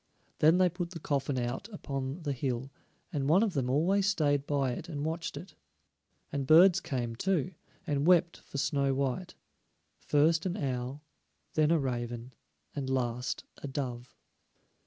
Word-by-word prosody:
Then 160 +3 +6
they 185 0 +5
put 175 0 -4
the 170 -2 -8
coffin 140 -2 -1
out 125 - -3
upon 140 -5 -5
the 145 -2 -1
hill, 130 0 -3 0.4
and 140 -1 0
one 185 +7 +5
of 210 -5 0
them 130 -5 0
always 185 +9 +2
stayed 145 -7 +1
by 140 -3 +1
it 155 +7 -6
and 145 -2 -3
watched 165 +2 -3
it. 185 - -9 0.8
And 140 -2 -2
birds 170 +4 +7
came 120 -4 -3
too, 185 +4 0 0.3
and 145 -2 0
wept 175 -1 +4
for - - -9
Snow 140 -1 +1
white; 140 +6 -2 0.6
first 160 +4 +2
an 180 +2 -2
owl, 130 -2 -3 0.5
then 155 -1 +3
a 165 - +4
raven, 120 -2 -3 0.4
and 135 -2 -3
last 125 -1 -1
a - - -7
dove. 125 -3 -5
145 Hz, 155 wpm, -31 LUFS, 130-170 Hz, 0.8 s, birds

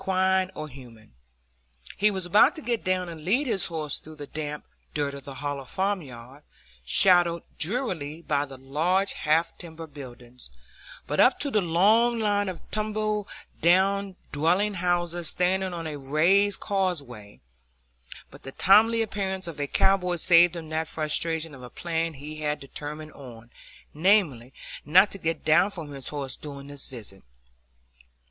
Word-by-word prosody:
He 190 - -6 2.0
was 190 -3 -2
about 210 - +5
to 315 - -8
get 235 -2 -1
down 185 -1 0
and 165 -2 -9
lead 235 - +1
his 215 -8 0
horse 155 -3 -2
through 155 0 -13
the 145 -1 -8
damp 150 0 -6 0.3
dirt 145 -2 -1
of 140 -1 -9
the 140 - -8
hollow 145 0 -4
farmyard, 140 -8 -4 0.4
shadowed 175 - +4 0.2
drearily 170 - -2
by 145 -2 0
the 135 -2 -11
large 165 +9 0
half 160 +2 +1
timbered 160 -3 -9
buildings, 125 - -11 0.6
up - - +4
to 285 - -2
the 210 - +2
long 210 +8 +3
line 205 -2 +1
of 180 - -7
tumble 215 -1 -1 0.3
down 190 +3 +3 0.2
dwelling 180 +8 +1
houses 175 -2 -1
standing 185 +1 0
on 170 -2 -5
a 150 -2 -5
raised 175 +9 +2
causeway; 145 - -3 0.9
but - - -14
the 135 - -9
timely 225 +4 +5
appearance 190 -3 -3
of 165 -3 -7
a 145 - -1
cowboy 180 0 +2
saved 175 0 +5
him 160 -2 -7
that 160 0 -2
frustration 160 +1 -1
of 135 - -11
a 125 - -9
plan 165 +2 -3
he 150 +3 -8
had 150 -1 -2
determined 150 +2 -8
on,—namely, 135 - -2 0.3
not 185 +7 +5
to 195 - -8
get 165 -1 -3
down 165 +5 +5
from 165 -7 -8
his 135 -2 -6
horse 140 -3 -4
during 140 -2 -9
this 145 -1 -6
visit. 105 -7 -10
165 Hz, 145 wpm, -26 LUFS, 145-190 Hz, 2.0 s, about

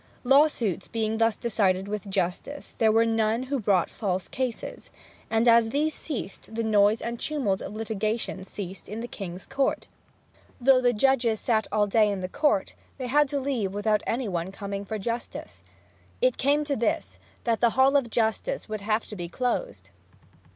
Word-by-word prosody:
Law 275 +4 +6
suits 205 - -3
being 220 0 -1
thus 225 -1 +3
decided 195 -4 +1
with 205 -1 -4
justice, 190 +9 -3
there 220 -1 +5
were 225 +1 +4
none 225 +1 +1
who 270 +1 -2
brought 195 -5 +2
false 190 -4 -3
cases. 255 -3 -4 0.4
And 225 +2 +2
as 230 -1 +6
these 300 +5 0
ceased, 225 -6 -6
the 230 - -1
noise 210 0 +3
and 235 0 -4
tumult 255 -11 0
of 210 - -6
litigation 215 -2 -2
ceased 190 -1 -7
in 215 +3 -5
the 240 - -4
king's 185 -5 -7
court. 275 -1 0 0.7
Though 260 +1 +5
the 245 -1 +4
judges 235 -2 +2
sat 220 -3 +1
all 210 -1 +3
day 210 +1 +3
in 200 -2 -2
the 185 - -2
court, 205 -1 +1 0.2
they 260 - -4
had 290 +3 +3
to 285 - -1
leave 240 -8 -2
without 210 0 +1
any 240 +1 -1
one 175 -1 -2
coming 200 0 -5
for 215 +2 -3
justice. 230 +4 -5 0.6
It - - +2
came 290 +2 +3
to 290 -1 -1
this, 235 - -1 0.2
that 230 -2 0
the 235 - +5
Hall 270 +2 +5
of 270 -4 +3
Justice 230 - -1
would 215 -1 -4
have 215 +2 0
to 210 - -7
be 175 -3 -5
closed! 255 - -3
225 Hz, 180 wpm, -26 LUFS, 205-255 Hz, 0.7 s, Law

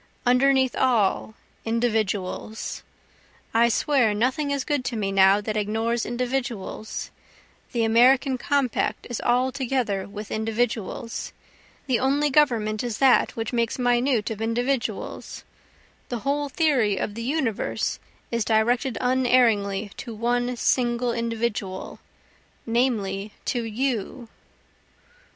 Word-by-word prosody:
Underneath 260 +1 +3
all, 220 -3 +1 0.3
individuals, 220 -3 -2 0.7
I 235 +1 +4
swear 245 -3 +2
nothing 260 +7 0
is 280 -1 -1
good 290 -3 -1
to 240 - -2
me 200 -3 -1
now 195 +1 +5
that 215 +1 -3
ignores 225 +3 -1
individuals, 240 -4 -3 0.6
The 235 -3 0
American 255 +4 +4
compact 255 -7 0
is 240 - -3
altogether 250 -5 0
with 210 +1 -8
individuals, 225 +1 -2 0.5
The 255 -5 +1
only 280 +3 +2
government 230 -7 +2
is 235 -3 -3
that 265 -2 +4
which 225 +1 -4
makes 235 -1 0
minute 245 -2 +1
of 220 -1 -5
individuals, 245 +3 -2 0.7
The 240 -3 -3
whole 285 +1 0
theory 260 - +2
of 205 - -2
the 230 - -6
universe 255 -3 -1 0.3
is 235 -1 0
directed 235 +3 +1
unerringly 235 -6 +2
to 235 -4 -7
one 245 +2 0
single 240 0 +1
individual 230 -5 -3 0.7
namely 215 -4 0
to 240 -2 -1
You. 235 0 -3
235 Hz, 110 wpm, -24 LUFS, 220-255 Hz, 0.7 s, now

